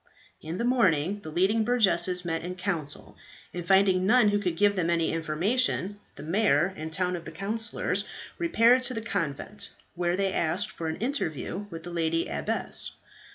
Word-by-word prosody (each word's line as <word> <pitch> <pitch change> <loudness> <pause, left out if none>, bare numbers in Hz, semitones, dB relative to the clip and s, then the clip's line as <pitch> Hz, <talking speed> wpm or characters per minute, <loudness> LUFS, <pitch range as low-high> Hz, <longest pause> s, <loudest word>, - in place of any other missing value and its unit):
In 160 +3 -5
the 235 - -1
morning 200 - +2
the 160 - -8
leading 190 +7 +2
burgesses 185 -6 +3
met 165 -1 -2
in 180 +1 -5
council, 175 -6 -3 0.4
and 175 - -4
finding 190 -1 +4
none 230 -1 +5
who 205 0 +1
could 180 -5 -2
give 205 +2 +3
them 175 -3 0
any 170 -1 +1
information, 185 +6 0 0.2
the 145 - -9
mayor 175 -1 +2
and 160 -1 -6
two 180 +2 +1
of 170 - -6
the - - -8
councillors 220 +4 -2 0.4
repaired 255 -7 +4
to 255 - -5
the 225 - -2
convent, 200 +1 -3 0.2
where 175 0 0
they 195 -1 0
asked 170 +5 +1
for 165 - -5
an 160 - -2
interview 205 - -3
with 165 -3 -8
the 175 - -7
lady 165 -1 0
abbess. 70 -1 -2
185 Hz, 175 wpm, -27 LUFS, 165-205 Hz, 0.4 s, none